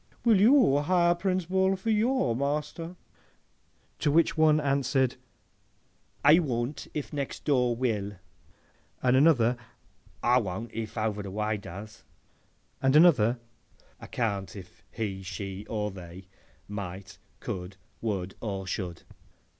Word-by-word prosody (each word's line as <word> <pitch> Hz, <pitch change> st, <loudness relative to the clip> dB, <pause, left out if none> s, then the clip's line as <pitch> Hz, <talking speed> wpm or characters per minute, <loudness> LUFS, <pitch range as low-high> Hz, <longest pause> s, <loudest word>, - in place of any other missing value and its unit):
—Will 220 Hz, -5 st, +5 dB
you 235 Hz, -, +6 dB
hire 175 Hz, +3 st, +3 dB
Prince 185 Hz, 0 st, -1 dB
Bull 190 Hz, +2 st, +2 dB
for 195 Hz, +4 st, -2 dB
your 220 Hz, -, +2 dB
master?' 150 Hz, +5 st, -3 dB, 1.0 s
To -, -, +1 dB
which 160 Hz, +3 st, +3 dB
one 155 Hz, -1 st, +4 dB
answered, 135 Hz, -2 st, +1 dB, 1.1 s
'I 155 Hz, +4 st, +8 dB
will 125 Hz, -4 st, -1 dB, 0.2 s
if 150 Hz, 0 st, -4 dB
next 140 Hz, -2 st, -4 dB
door 125 Hz, -5 st, +2 dB
will;' 110 Hz, -5 st, -1 dB, 0.9 s
and 125 Hz, 0 st, +4 dB
another, 130 Hz, -5 st, +4 dB, 0.7 s
'I 125 Hz, +1 st, +5 dB
won't 105 Hz, +2 st, -5 dB
if 110 Hz, 0 st, -5 dB
over 110 Hz, -1 st, -1 dB
the 100 Hz, -, -6 dB
way 105 Hz, +2 st, -1 dB
does;' 100 Hz, +3 st, -10 dB, 0.8 s
and 135 Hz, +1 st, +3 dB
another, 130 Hz, -8 st, +5 dB, 0.6 s
'I -, -, -10 dB
can't 100 Hz, -5 st, -2 dB
if 90 Hz, -3 st, -12 dB
he, 100 Hz, -4 st, -4 dB
she, 95 Hz, +1 st, -6 dB
or 105 Hz, -2 st, -2 dB
they, 90 Hz, 0 st, -10 dB, 0.4 s
might, 100 Hz, 0 st, -7 dB, 0.2 s
could, 90 Hz, +1 st, -6 dB, 0.2 s
would, 95 Hz, -4 st, -2 dB
or 100 Hz, -4 st, -4 dB
should. 95 Hz, -2 st, -4 dB
120 Hz, 125 wpm, -28 LUFS, 100-150 Hz, 1.1 s, I